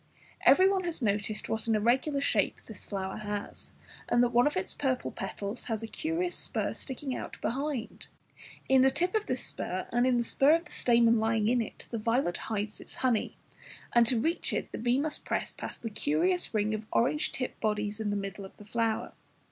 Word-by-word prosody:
Everyone 380 0 +6
has 340 -2 -2
noticed 210 0 -1
what 220 +1 -2
an 225 - +3
irregular 260 +7 +2
shape - - +1
this - - -11
flower 190 -2 -4
has, 205 -1 -5 0.4
and 240 - +4
that 245 - +3
one 245 +3 +5
of 295 - -1
its 185 - 0
purple 260 -3 -1
petals 200 +3 -5
has 225 -2 -2
a - - -3
curious 330 +8 -2
spur - - 0
sticking 265 0 -4
out - - -7
behind. 270 -1 -3 0.6
In 265 -1 +5
the 265 - +6
tip 355 +7 0
of 435 -1 0
this 255 -1 -1
spur 185 +1 -3
and 240 +1 +3
in 250 -1 +3
the 240 - +2
spur 275 +6 +5
of 335 +1 -2
the - - -14
stamen 235 -1 +4
lying 220 -1 +1
in 245 +1 +3
it 225 - -7
the 230 - -2
violet 230 -4 +1
hides 210 -1 -3
its - - -7
honey, 240 -4 +1 0.6
and 235 -1 +5
to 240 -1 +2
reach 325 +8 0
it - - -2
the - - -5
bee 245 +3 +2
must 310 +1 +1
press - - -2
past - - -8
the 225 - -3
curious 180 +1 +1
ring 215 0 +1
of 215 0 -4
orange 295 +6 +2
tipped 255 - -4
bodies 210 0 -1
in 215 -1 -1
the 205 - 0
middle 200 0 -4
of 190 - -12
the 210 - -13
flower. 225 0 -1
230 Hz, 205 wpm, -30 LUFS, 210-265 Hz, 0.6 s, Everyone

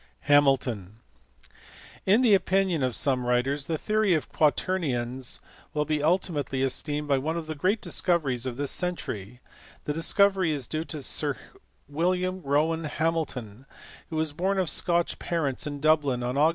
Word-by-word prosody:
Hamilton*. 130 -8 +2 1.1
In 210 +6 +5
the 235 -5 +5
opinion 190 -4 +2
of 130 -2 0
some 130 -3 0
writers, 135 +3 0
the 160 - -1
theory 215 0 +2
of 155 - -3
quaternions 130 -6 0 0.4
will 150 0 +1
be 150 -1 -1
ultimately 150 -5 0
esteemed 145 +3 -1
one 145 +4 0
of 165 - -4
the 155 - -4
great 185 +8 0
discoveries 140 -9 0
of 125 -1 -5
this 140 -1 -1
century: 125 - -4 0.4
that 150 - -2
discovery 185 +2 +3
is 140 -4 -2
due 155 +6 -3
to 155 -5 -4
Sir - - +1 0.5
William 180 +5 -1
Rowan 160 +3 +1
Hamilton, 145 -8 -3 0.4
who 160 - -5
was 155 -1 0
born 190 +5 0
of 185 -4 +1
Scotch 170 -1 +1
parents 155 -6 -2
in 145 -1 -5
Dublin 145 -5 +2
on 125 +1 -1
Aug. 150 +4 +4
150 Hz, 150 wpm, -27 LUFS, 135-170 Hz, 1.1 s, In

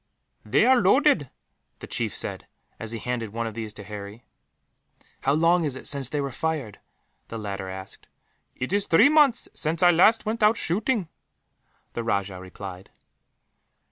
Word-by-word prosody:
"They 130 - +3
are 255 -1 +5
loaded," 200 - +3 0.5
the - - -9
chief - - -1
said, - - -3 0.3
as 115 -1 -4
he 115 - -4
handed 115 0 -3
one 115 +3 -3
of 110 - -4
these 110 -1 -5
to 100 - -9
Harry. 105 +2 -9 1.0
"How 135 - +2
long 165 +3 +3
is 145 -4 -2
it 130 - -8
since 140 -3 0
they 150 - -2
were 140 -1 -2
fired?" 140 -6 -3 0.5
the 115 - -6
latter 100 -3 -5
asked. 95 0 -9 0.5
"It 130 +8 -4
is 205 0 +1
three 220 +12 +6
months 290 -6 +4
since 160 +3 -1
I 175 - +8
last 210 +7 +4
went 225 +2 -2
out 210 +1 +4
shooting," 205 +3 -1 0.9
the 115 - -3
rajah 100 -4 -1
replied. 95 0 -9
135 Hz, 165 wpm, -25 LUFS, -, 1.0 s, I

